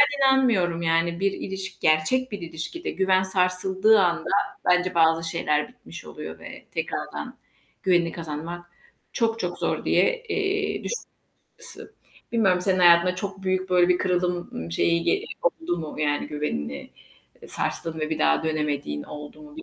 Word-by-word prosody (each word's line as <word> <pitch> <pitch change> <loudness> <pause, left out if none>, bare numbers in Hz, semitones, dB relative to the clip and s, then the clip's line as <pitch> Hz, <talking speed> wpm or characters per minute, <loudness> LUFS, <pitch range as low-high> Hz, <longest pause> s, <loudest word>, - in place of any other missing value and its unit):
Ben 285 0 +4
inanmıyorum, 220 -11 +3
yani, 165 +1 +1
bir 195 0 +2
ilişki, 190 -1 -6
gerçek 160 +12 +2
bir 205 - -4
ilişkide 170 - -5
güven 190 0 +2
sarsıldığı 190 +3 +3
anda 170 -2 +1 0.4
bence 180 0 +2
bazı 165 0 +3
şeyler 150 0 0
bitmiş 250 -1 -12
oluyor - - -8
ve - - -11
tekrardan - - -4 0.4
güvenini 175 -3 +2
kazanmak 170 +2 -6 0.4
çok 225 -1 0
çok 175 0 -3
zor - - -1
diye, - - +2
eee, 405 0 -1
düş - - -2 0.7
ısı - - -10 0.4
Bilmiyorum, 195 -6 +3
senin 185 0 +1
hayatında 175 0 +6
çok 195 0 -6
büyük, 185 0 -1
böyle, 180 -1 +4
bir 180 0 +3
kırıldım, 180 -1 0
ımm, 80 +1 -6
şeyi 170 - +2
ge 400 - +2 0.4
oldu 175 - -1
mu, 155 -1 -6
yani, 145 -1 0
güvenini, 75 - -4 0.5
eee, - - -11
sarstın 160 -1 -3
ve 155 0 -2
bir 160 - -1
daha 75 0 +3
dönemediğin 145 - -2
oldu 150 - -10
mu 300 0 -14
bil 320 - -7
180 Hz, 155 wpm, -25 LUFS, 165-195 Hz, 0.7 s, hayatında